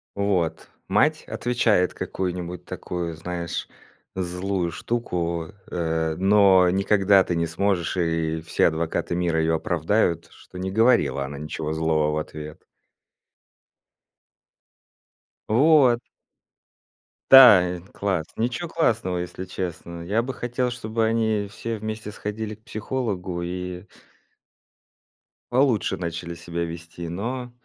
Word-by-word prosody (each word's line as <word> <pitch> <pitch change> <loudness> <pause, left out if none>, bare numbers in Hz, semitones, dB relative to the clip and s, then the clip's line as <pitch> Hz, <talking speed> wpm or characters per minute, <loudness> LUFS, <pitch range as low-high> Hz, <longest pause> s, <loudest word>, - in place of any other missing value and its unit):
Вот. 100 -5 0 0.2
Мать - - +2
отвечает 115 -7 +1
какую-нибудь 90 -1 -4
такую, 85 -2 -4
знаешь, 85 +1 -4 0.4
злую 90 -1 -2
штуку, 85 -8 -3
э, 80 -2 -1
но 95 -2 +5
никогда 100 +1 +4
ты 90 - -2
не 85 0 0
сможешь, 90 +1 0
и 80 -2 0
все 80 - +2
адвокаты 80 +2 -1
мира 85 -2 +1
её 80 0 +2
оправдают, 85 +1 0
что 90 - -14
не 95 - -2
говорила 95 - +3
она 70 +1 -6
ничего 75 +1 -4
злого 80 -1 +1
в 75 - -1
ответ. 75 0 -7 2.9
Вот. 130 0 +5 1.3
Да, 95 -10 +8
класс, 95 -6 -1
ничего 125 +10 -2
классного, 115 - 0
если 90 +1 -5
честно. 85 -2 -6
Я 105 +7 +1
бы 130 +2 -4
хотел, 125 +1 -2
чтобы 115 -2 -2
они 110 -2 +1
все 115 +2 -5
вместе 110 0 -5
сходили 105 +1 -5
к 110 - -31
психологу 105 -7 -3
и 90 +1 -5 1.7
получше 125 -4 +2
начали 85 -1 -4
себя 85 0 -4
вести, 85 0 -7
но 120 +7 -4
90 Hz, 110 wpm, -24 LUFS, 85-110 Hz, 2.9 s, Да